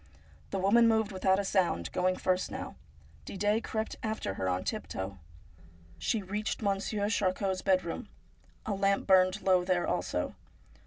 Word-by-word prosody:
The 195 - -2
woman 210 +5 +5
moved 220 -2 +2
without 190 0 +2
a 200 - 0
sound, 175 - +1
going 185 0 +1
first 185 0 0
now. - - -6 0.5
Didet 210 +3 0
crept 220 0 -3
after 220 - -2
her 95 -1 -2
on 90 0 -1
tiptoe. 95 0 -4 0.8
She 205 - 0
reached 210 +3 -3
Monsieur 200 +1 0
Charcot's 190 -2 0
bedroom. 185 -3 0 0.6
A 215 - -1
lamp 195 0 +1
burned 185 +1 +4
low 185 -2 +4
there 180 -1 +1
also. 90 0 -1
190 Hz, 145 wpm, -30 LUFS, 185-205 Hz, 0.8 s, woman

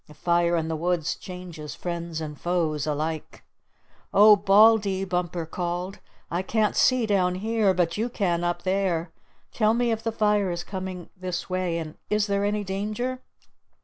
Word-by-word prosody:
A 150 - -14
fire 170 +2 +2
in 160 -1 -1
the 160 - -2
woods 165 0 -1
changes 175 -5 -8
friends 170 -2 -4
and 150 -2 -7
foes 160 -4 0
alike. 155 +1 -3 0.7
"O 210 +1 +9
Baldy," 200 -1 +4
Bumper 175 -2 -2
called, 175 +3 -4 0.3
"I 175 +2 0
can't 215 +2 0
see 255 -2 +3
down 185 -4 +2
here, 215 +1 +1
but 175 0 0
you 225 +3 -1
can 175 -7 0
up 175 0 -1
there. 185 -3 0 0.4
Tell 220 0 +2
me 240 0 +1
if 225 0 -1
the 225 - -2
fire 210 -3 +2
is 175 0 -3
coming 185 -2 -6
this 185 0 -5
way, 185 -2 0
and 160 -2 -7
is 210 0 +2
there 200 -1 0
any 205 0 0
danger?" 215 +7 -3
185 Hz, 165 wpm, -25 LUFS, 170-210 Hz, 0.7 s, O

